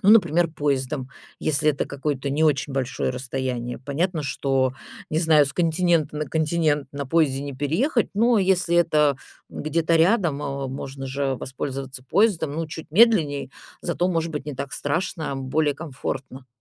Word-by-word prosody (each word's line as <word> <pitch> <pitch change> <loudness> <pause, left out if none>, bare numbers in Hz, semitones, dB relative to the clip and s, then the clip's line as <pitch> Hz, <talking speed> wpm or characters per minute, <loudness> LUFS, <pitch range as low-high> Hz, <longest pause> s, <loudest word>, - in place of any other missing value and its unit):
ну, 195 - +1
например, 175 -6 +5
поездом, 140 -3 -1 0.3
если 150 0 +2
это 145 - -2
какое-то 140 -1 -3
не 150 +3 0
очень 145 -2 +1
большое 130 -1 -1
расстояние? 125 -2 -3
Понятно, 155 +5 -1
что, 135 -1 0 0.4
не 155 - +1
знаю, 160 -3 +5
с 140 - -4
континента 165 -2 +1
на 150 0 -2
континент 155 -2 +1
на 140 -1 -4
поезде 140 -3 +2
не 140 -1 -5
переехать, 170 - 0
но 230 +2 +4
если 185 -3 +2
это 150 -5 +3 0.3
где-то 165 +2 0
рядом, 170 -4 +2
э, 140 -1 -3
можно 135 0 -6
же 135 0 -1
воспользоваться 135 0 -5
поездом. 195 -7 +2
Ну, 165 +1 -2
чуть 160 0 -8
медленней, 160 - +4 0.3
зато, 180 +1 0
может 165 -2 0
быть, 150 -1 -5
не 145 - -4
так 140 +1 -5
страшно, 150 -1 -2
более 145 +2 0
комфортно. 135 -3 -6
150 Hz, 155 wpm, -24 LUFS, 135-165 Hz, 0.4 s, например